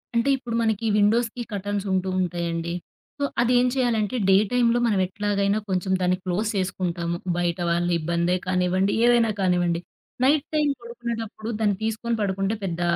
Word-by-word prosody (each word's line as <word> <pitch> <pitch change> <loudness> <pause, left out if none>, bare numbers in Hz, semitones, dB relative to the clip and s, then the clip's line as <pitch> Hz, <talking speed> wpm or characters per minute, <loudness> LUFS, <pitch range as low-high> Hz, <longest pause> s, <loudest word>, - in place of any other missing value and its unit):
అంటే 235 +4 +2
ఇప్పుడు 240 -3 -5
మనకి 220 0 0
విండోస్‌కి 230 +3 +2
కర్టెన్స్ 205 0 -2
ఉంటూ 185 0 0
ఉంటాయండి. 170 -1 -2 0.5
సో - - -1 0.2
అది 240 +1 +2
ఏం 250 - +3
చేయాలంటే 240 -3 +1
డే 190 - +7 0.2
టైమ్‌లో 240 -1 +3
మనం 205 -4 +2
ఎట్లాగైనా 205 +1 0
కొంచెం 185 0 -1
దాన్ని 180 0 +2
క్లోజ్ 195 +4 -1
చేసుకుంటాము. 175 -3 -2 0.2
బయట 175 0 -1
వాళ్ల 175 +1 +1
ఇబ్బందే 170 +2 0
కానివ్వండి, 185 +1 +1
ఏదైనా 240 -2 +4
కానివ్వండి. 175 -2 +1 0.4
నైట్ 285 +2 +3
టైమ్ 300 -2 +2
పడుకునేటప్పుడు 235 -2 -5
దాన్ని 205 -2 +2
తీసుకొని 225 +1 -1
పడుకుంటే 195 +1 0
పెద్ద 175 -2 -3
200 Hz, 150 wpm, -24 LUFS, 180-230 Hz, 0.5 s, డే